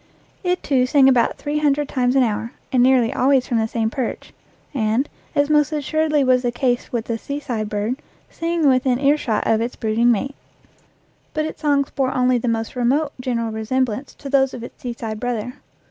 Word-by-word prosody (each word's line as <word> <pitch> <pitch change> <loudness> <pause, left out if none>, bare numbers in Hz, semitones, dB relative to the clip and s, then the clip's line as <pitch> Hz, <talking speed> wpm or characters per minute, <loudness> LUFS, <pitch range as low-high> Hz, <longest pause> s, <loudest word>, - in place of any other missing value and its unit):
It, 360 0 0
too, 255 -3 +2
sang 270 0 +5
about 250 -3 +3
three 295 +1 -2
hundred 295 -1 +1
times 250 -1 0
an 265 - +5
hour, 225 +1 -2 0.2
and 255 - +3
nearly 250 -2 +4
always 265 0 +3
from 235 -3 0
the 220 - +1
same 225 -1 -1
perch, 255 -2 -4 0.4
and, 230 +2 +1 0.3
as 285 0 +3
most 300 0 +3
assuredly 305 0 +1
was 255 -1 +3
the 245 -1 0
case 245 0 -1
with 235 -2 -2
the 230 -1 -3
seaside 255 -7 -4
bird, 210 +6 -2 0.3
singing 330 -2 -1
within 255 -1 +3
earshot 275 -4 +1
of 225 0 +2
its 235 +2 -3
brooding 230 +2 +2
mate. 270 +5 -1 1.0
But 310 0 0
its 315 - -7
songs 285 -2 +1
bore 265 -2 -1
only 250 -1 +3
the 245 - -3
most 225 0 -2
remote 275 +5 +1
general 230 -3 -1
resemblance 240 +3 -2
to 280 - -9
those 270 -1 +2
of 235 - -8
its - - -11
seaside 230 -3 -5
brother. 245 0 -3
255 Hz, 190 wpm, -21 LUFS, 230-280 Hz, 1.0 s, sang